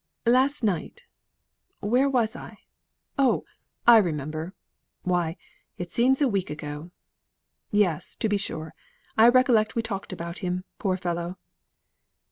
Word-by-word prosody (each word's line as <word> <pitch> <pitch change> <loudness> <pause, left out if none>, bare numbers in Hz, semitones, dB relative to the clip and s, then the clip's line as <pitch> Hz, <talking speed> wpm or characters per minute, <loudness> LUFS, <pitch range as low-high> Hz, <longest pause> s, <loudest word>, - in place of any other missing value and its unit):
"Last 260 +4 +3
night. 215 - -1 0.8
Where 250 +7 +2
was 240 -5 +1
I? - - -9 0.6
Oh, 265 -3 +3 0.4
I 235 -1 +9
remember! 155 0 -3 0.5
Why, 175 -2 0 0.4
it 175 -1 -6
seems 265 +4 +3
a - - +4
week 195 -6 -1
ago. 150 +2 -6 0.8
Yes, 185 -5 +1
to - - -1
be 205 -1 +1
sure, 160 -5 -5 0.4
I 225 +2 +7
recollect 240 -4 +4
we 230 - 0
talked 200 -3 -5
about 170 0 -6
him, 180 -1 -2 0.2
poor 190 -3 0
fellow." 175 0 -3
195 Hz, 125 wpm, -26 LUFS, 170-235 Hz, 0.8 s, I